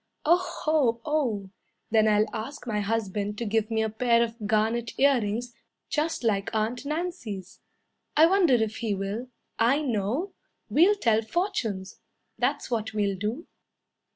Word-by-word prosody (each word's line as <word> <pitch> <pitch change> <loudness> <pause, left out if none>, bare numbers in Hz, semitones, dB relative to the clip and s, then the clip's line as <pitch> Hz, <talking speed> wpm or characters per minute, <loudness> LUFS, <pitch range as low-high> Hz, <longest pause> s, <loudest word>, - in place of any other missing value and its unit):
"Oh 350 +4 +1
o 270 -7 +2
o! 240 -11 0 0.4
Then 220 -1 +4
I'll 210 0 +4
ask 240 +7 -6
my 215 -3 -1
husband 205 -1 -2
to 235 - -3
give 220 0 0
me 220 -1 +1
a 220 - 0
pair 235 +1 +3
of 225 -2 -5
garnet 220 +2 0
earrings 245 -3 +2 0.4
Just 310 -2 -1
like 200 -4 +1
Aunt 225 +5 -1
Nancy's. 300 - -4 0.6
I 315 - +8
wonder 350 -6 +4
if 220 -2 0
he 220 -3 -1
will. 200 +6 -4 0.3
I 265 +7 +3
know. 250 - -1 0.4
We'll 365 +7 +5
tell 225 - +2
fortunes. 220 - -2 0.4
That's 255 +2 -1
what 220 -2 -1
we'll 200 -2 +1
do." 215 - -3
230 Hz, 145 wpm, -27 LUFS, 210-280 Hz, 0.6 s, I